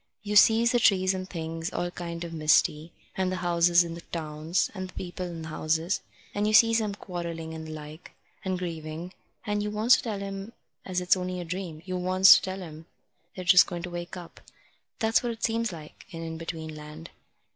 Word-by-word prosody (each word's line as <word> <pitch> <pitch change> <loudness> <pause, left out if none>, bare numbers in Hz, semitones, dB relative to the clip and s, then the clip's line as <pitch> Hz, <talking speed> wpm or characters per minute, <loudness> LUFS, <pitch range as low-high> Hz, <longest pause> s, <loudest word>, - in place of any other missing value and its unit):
You 210 0 -3
sees 225 +3 +6
the 240 - +3
trees 190 -3 +4
and 185 0 -5
things, 165 -1 -4
all 175 0 -2
kind 170 -1 -6
of 170 -1 -6
misty, 155 0 +2 0.2
and 185 -1 0
the - - -1
houses 175 -1 +4
in 170 -1 -6
the 170 - -8
towns, 155 +1 -2
and 185 -2 -5
the - - -14
people 180 0 -5
in 165 -2 -7
the 160 - -7
houses. 160 +4 0 0.3
And 205 +1 0
you 215 - +1
sees 230 +1 +6
'em 210 -2 -2
quarrelling 170 -4 -6
and 160 0 -7
the - - -7
like, 155 +1 -9 0.3
and 185 -1 -1
grieving, 165 0 -6 0.3
and 210 -1 -1
you 210 - -2
wants 215 +4 +4
to - - -4
tell 210 -4 -4
'em 195 +3 -6 0.3
as 180 -1 -1
it's 180 +1 +4
only 180 0 -3
a 175 - -5
dream. 170 -2 -5
You 185 -1 -3
wants 185 +1 +7
to - - +2
tell 190 0 -5
'em 160 -1 -11 0.5
they're 185 - -6
just 180 0 +7
going 175 -2 -5
to 180 - -5
wake 175 +1 -6
up. 175 -2 -11 0.6
That's 225 -1 +2
what 240 -1 -2
it 225 - -12
seems 230 -1 0
like 155 -3 -11
in 165 -2 -7
In 160 0 -6
between 160 -1 -6
Land." 150 +2 -10
180 Hz, 215 wpm, -27 LUFS, 165-195 Hz, 0.6 s, wants